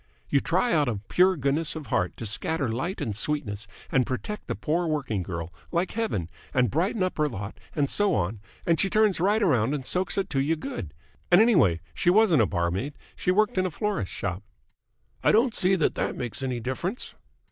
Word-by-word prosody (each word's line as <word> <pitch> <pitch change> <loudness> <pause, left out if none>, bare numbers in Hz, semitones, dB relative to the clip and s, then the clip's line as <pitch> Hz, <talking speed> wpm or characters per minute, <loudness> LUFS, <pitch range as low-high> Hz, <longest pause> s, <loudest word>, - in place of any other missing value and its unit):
"You 140 - +5
try 185 - +1
out 150 -3 +3
of 105 -4 -3
pure 185 0 +4
goodness 145 +4 0
of 155 -2 -6
heart 90 -6 -1
to 115 - -5
scatter 125 +8 +1
light 130 - -3
and 105 - -2
sweetness 115 -4 -2 0.2
and 130 - +4
protect 210 - -5
the - - -2
poor 170 +2 0
working 135 -10 -1
girl 85 -2 -5 0.2
like 175 +1 0
Heaven 215 - -2 0.3
and 125 -3 +3
brighten 185 - +1
up 185 -3 -2
her 150 -1 +2
lot 105 -4 -7 0.2
and 145 -2 +2
so 205 +5 +2
on, 95 +5 -1 0.3
and 165 -1 +2
she 195 - +3
turns 215 -3 +3
right 205 +5 +2
around 130 - +2
and 135 -3 -5
soaks 185 +6 0
it 195 - 0
to 135 - +1
you 155 +4 +1
good! 90 - -6 0.3
And 175 - +7
anyway 165 - +4
she - - +1
wasn't 185 - +5
a 110 - +3
barmaid. 90 - -2 0.2
She - - -2
worked 210 +2 +3
in 185 - +2
a - - -3
florist's 205 - -2
shop." 90 -1 -3 0.8
"I - - +5
don't 235 +2 +3
see 190 -1 +2
that 165 - +1
that - - -2
makes 120 0 -5
any 130 -2 -2
difference." 150 - -4
150 Hz, 205 wpm, -26 LUFS, 115-185 Hz, 0.8 s, And